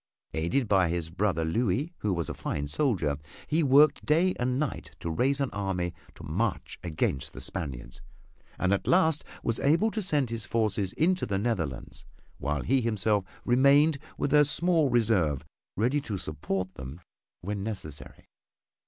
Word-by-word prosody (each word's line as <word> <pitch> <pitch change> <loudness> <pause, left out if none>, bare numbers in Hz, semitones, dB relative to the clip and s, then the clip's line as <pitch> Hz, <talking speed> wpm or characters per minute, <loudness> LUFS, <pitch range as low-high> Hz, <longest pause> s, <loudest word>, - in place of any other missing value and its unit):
Aided 85 +11 0
by 95 -4 +3
his 85 -1 -2
brother 90 -3 0
Louis, 120 - 0
who 105 - -1
was 85 -4 -1
a - - -3
fine 70 - -3
soldier, 80 - 0 0.3
he 160 +2 +1
worked 145 +1 +5
day 170 +5 +3
and 125 +1 0
night 150 -2 -4
to 85 - -3
raise 135 - +1
an 135 -2 -1
army 95 -4 -2 0.2
to - - -12
march 95 +6 -2
against 75 -5 -2
the - - -8
Spaniards, 60 -6 -6 0.6
and 95 +1 +2
at 100 - -1
last 160 -4 +3 0.2
was 115 -1 -1
able 170 +10 +3
to 220 - -2
send 145 - 0
his 115 -2 -3
forces 105 -4 0
into 180 +3 +1
the 100 - 0
Netherlands, 95 - -3 0.4
while 75 0 -1
he 135 0 +2
himself 105 -3 +1 0.2
remained 140 +4 +5 0.2
with 140 - -1
a 150 0 +7
small 160 0 +3
reserve 105 - +2 0.3
ready 125 +8 +2
to 110 -8 -4
support 95 +4 -3
them 65 +6 -9 0.4
when 100 +2 -3
necessary. 95 -9 -7
110 Hz, 160 wpm, -28 LUFS, 85-140 Hz, 0.6 s, a